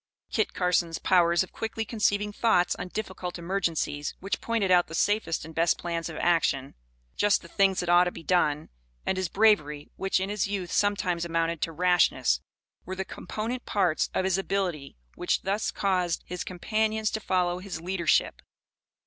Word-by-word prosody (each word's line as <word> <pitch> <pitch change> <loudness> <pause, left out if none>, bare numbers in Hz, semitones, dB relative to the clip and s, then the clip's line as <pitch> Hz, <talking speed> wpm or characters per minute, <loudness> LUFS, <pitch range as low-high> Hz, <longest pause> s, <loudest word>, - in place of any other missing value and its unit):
Kit 220 - 0
Carson's 175 -2 +1
powers 175 -1 +3
of 185 - -12
quickly 225 0 -4
conceiving 210 -1 0
thoughts, 205 -6 +2
on - - -5
difficult 185 -3 -5
emergencies, 170 -5 -2
which 195 +2 -3
pointed 225 -5 0
out 180 -1 +5
the 165 - -7
safest 205 -5 0
and 160 - -10
best 165 +1 +2
plans 170 -1 -3
of - - -7
action, 155 -6 +1 0.4
"just 205 -2 +2
the - - -11
things 195 +1 +2
that 180 - -5
ought 175 +1 +6
to 180 - -1
be 165 - -10
done," 155 -4 +1 0.4
and - - 0
his 185 -2 -2
bravery, 160 -9 +2
which, 195 0 +1
in 190 +1 -2
his 210 -2 0
youth, 195 -4 -3
sometimes 195 -4 +1
amounted 165 -1 -1
to 165 - -1
rashness, 175 - +2 0.4
were 185 - -6
the 190 0 -3
component 235 +6 -5
parts 180 -6 +1
of - - +1
his 190 0 +1
ability 180 - -2 0.2
which - - -1
thus 200 +3 0
caused 180 -4 0
his 180 0 -5
companions 215 +4 -1
to 220 - -2
follow 180 -3 0
his 185 -3 -6
leadership. 175 -1 +1
180 Hz, 175 wpm, -27 LUFS, 170-200 Hz, 0.4 s, ought